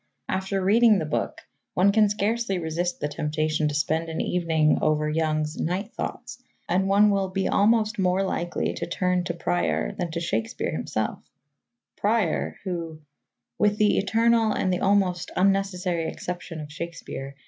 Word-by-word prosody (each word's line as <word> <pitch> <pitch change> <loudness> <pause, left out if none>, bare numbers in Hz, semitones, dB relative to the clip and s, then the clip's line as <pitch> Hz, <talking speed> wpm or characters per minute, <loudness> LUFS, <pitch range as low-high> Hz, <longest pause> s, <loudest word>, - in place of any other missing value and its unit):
After 190 +1 -1
reading 220 +2 +5
the 160 - -2
book, 150 - -2 0.3
one 190 +3 +5
can 210 0 +4
scarcely 210 0 0
resist 175 +1 -2
the 145 - -1
temptation 155 +1 -1
to 150 - -2
spend 160 +2 0
an 160 - -4
evening 160 -3 +2
over 155 0 +2
Young's 155 0 -1
Night 195 +7 -2
Thoughts - - -6 0.3
and 185 +2 +1
one 205 +1 +5
will 195 -1 0
be 190 0 -1
almost 215 +1 +2
more 185 +1 +2
likely 175 -2 -2
to - - -4
turn 180 +1 0
to 170 -2 -3
Prior 85 - 0
than 180 -4 -4
to 165 +1 -3
Shakespeare 115 -10 -2
himself - - -2 0.8
Prior 210 -5 0
who, 165 -4 -5 0.6
"with 210 0 +3
the 210 -1 +3
eternal 225 +2 +3
and 185 - 0
almost 190 -3 +2
unnecessary 185 -3 +1
exception 175 -2 -6
of 150 0 -9
Shakespeare 155 -4 -7
180 Hz, 150 wpm, -25 LUFS, 160-200 Hz, 0.8 s, reading